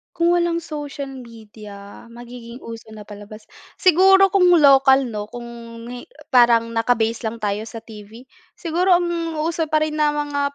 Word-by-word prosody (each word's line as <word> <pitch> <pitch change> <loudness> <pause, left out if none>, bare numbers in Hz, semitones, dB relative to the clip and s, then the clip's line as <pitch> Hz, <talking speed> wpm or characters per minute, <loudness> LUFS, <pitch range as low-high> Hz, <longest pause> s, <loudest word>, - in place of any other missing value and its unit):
Kung 340 0 +1
walang 345 -1 0
social 290 -3 -7
media, 215 -5 -13
magiging 240 +1 -12
uso 230 -1 -10
na 210 - -10
palabas? 205 +1 -13 0.2
Siguro 385 +2 +4
kung 375 -2 +3 0.2
lokal 270 -2 +5
'no, 210 -1 -5
kung 240 +2 -10 0.5
hi 245 0 -9 0.2
parang 235 -2 +4
naka-base 230 0 -1
lang 225 0 -6
tayo 210 +2 -3
sa 225 0 -9
TV, 220 +1 -13 0.3
siguro 355 +2 +1
ang 345 0 0 0.3
uso 325 0 -2
pa 310 0 0
rin 310 0 -3
na 295 -1 +1
mga 285 -1 -3
245 Hz, 155 wpm, -20 LUFS, 225-310 Hz, 0.5 s, lokal